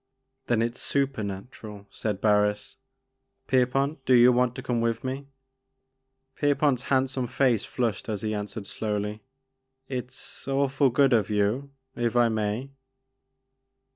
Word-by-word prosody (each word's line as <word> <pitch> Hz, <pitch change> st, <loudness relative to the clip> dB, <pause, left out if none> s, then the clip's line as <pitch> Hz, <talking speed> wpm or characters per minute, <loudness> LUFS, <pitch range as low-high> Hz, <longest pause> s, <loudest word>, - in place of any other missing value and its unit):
" 130 Hz, 0 st, -50 dB
Then 115 Hz, -2 st, +2 dB
it 120 Hz, +1 st, -2 dB
's -, -, -7 dB
supernatural," 105 Hz, -5 st, -3 dB
said 105 Hz, -3 st, -3 dB
Barris; 105 Hz, -1 st, +2 dB, 0.3 s
" 130 Hz, 0 st, -51 dB
Pier 130 Hz, -2 st, +3 dB
pont, 135 Hz, +2 st, -1 dB
do 130 Hz, -1 st, +4 dB
you 120 Hz, +1 st, +7 dB
want 125 Hz, 0 st, +2 dB
to -, -, -6 dB
come 120 Hz, -2 st, 0 dB
with 115 Hz, 0 st, -1 dB
me? 135 Hz, +2 st, -4 dB, 0.5 s
" 130 Hz, 0 st, -52 dB
Pierpont' 145 Hz, -2 st, +2 dB
s 130 Hz, -, -10 dB
handsome 130 Hz, -1 st, +1 dB
face 120 Hz, -4 st, +2 dB
flushed 115 Hz, -5 st, -2 dB
as 105 Hz, -2 st, -3 dB
he 110 Hz, 0 st, -1 dB
an 105 Hz, -1 st, -3 dB
swered 105 Hz, -1 st, -7 dB
slowly, 105 Hz, +1 st, -3 dB, 0.7 s
"It's 130 Hz, +1 st, -7 dB
awfully 135 Hz, 0 st, +2 dB
good 135 Hz, +1 st, +3 dB
of 110 Hz, -2 st, +2 dB
you, 105 Hz, +7 st, 0 dB
— 130 Hz, -, -53 dB
if 120 Hz, 0 st, -1 dB
I 120 Hz, -1 st, +5 dB
may." 110 Hz, +4 st, -2 dB
125 Hz, 160 wpm, -26 LUFS, 110-130 Hz, 0.7 s, you